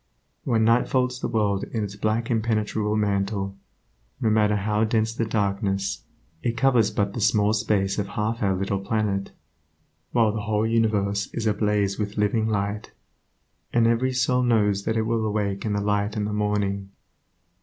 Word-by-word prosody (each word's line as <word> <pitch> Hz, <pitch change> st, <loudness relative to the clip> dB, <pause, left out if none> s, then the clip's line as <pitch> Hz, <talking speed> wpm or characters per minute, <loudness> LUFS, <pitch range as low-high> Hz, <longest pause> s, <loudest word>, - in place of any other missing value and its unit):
When 115 Hz, -3 st, +2 dB
night 115 Hz, +2 st, +3 dB
folds 125 Hz, -1 st, 0 dB
the -, -, -2 dB
world 105 Hz, -4 st, 0 dB
in 110 Hz, -2 st, -3 dB
its 100 Hz, 0 st, -5 dB
black 110 Hz, +3 st, -1 dB
impenetrable 110 Hz, -2 st, 0 dB
mantle, 100 Hz, -1 st, -1 dB, 0.6 s
no 110 Hz, -, +1 dB
matter 105 Hz, -1 st, +3 dB
how 105 Hz, +1 st, 0 dB
dense 110 Hz, 0 st, +1 dB
the 115 Hz, -, -1 dB
darkness, 100 Hz, -, -1 dB, 0.4 s
it 115 Hz, -1 st, -2 dB
covers 120 Hz, -3 st, +3 dB
but 100 Hz, -1 st, -1 dB
the 120 Hz, -, -4 dB
small 105 Hz, 0 st, +3 dB
space 105 Hz, -3 st, 0 dB
of 100 Hz, -, -2 dB
half 105 Hz, +3 st, -2 dB
our 95 Hz, -2 st, +2 dB
little 95 Hz, +1 st, -1 dB
planet, 100 Hz, -1 st, -1 dB, 0.8 s
while 115 Hz, -3 st, +3 dB
the 110 Hz, 0 st, -3 dB
whole 105 Hz, +1 st, 0 dB
universe 105 Hz, -3 st, +1 dB
is 115 Hz, -, -2 dB
ablaze 105 Hz, -2 st, +1 dB
with 105 Hz, 0 st, -3 dB
living 110 Hz, +2 st, +1 dB
light, 100 Hz, 0 st, -2 dB, 0.8 s
and 115 Hz, -1 st, +3 dB
every 115 Hz, +3 st, +2 dB
soul 125 Hz, 0 st, +1 dB
knows 105 Hz, -5 st, +2 dB
that 110 Hz, 0 st, 0 dB
it 110 Hz, -, +1 dB
will 115 Hz, 0 st, 0 dB
awake 105 Hz, -2 st, -1 dB
in 105 Hz, -, 0 dB
the 100 Hz, -, 0 dB
light 105 Hz, +1 st, 0 dB
in 105 Hz, -, 0 dB
the 105 Hz, -, -3 dB
morning. 100 Hz, -2 st, -1 dB
105 Hz, 170 wpm, -24 LUFS, 100-110 Hz, 0.8 s, night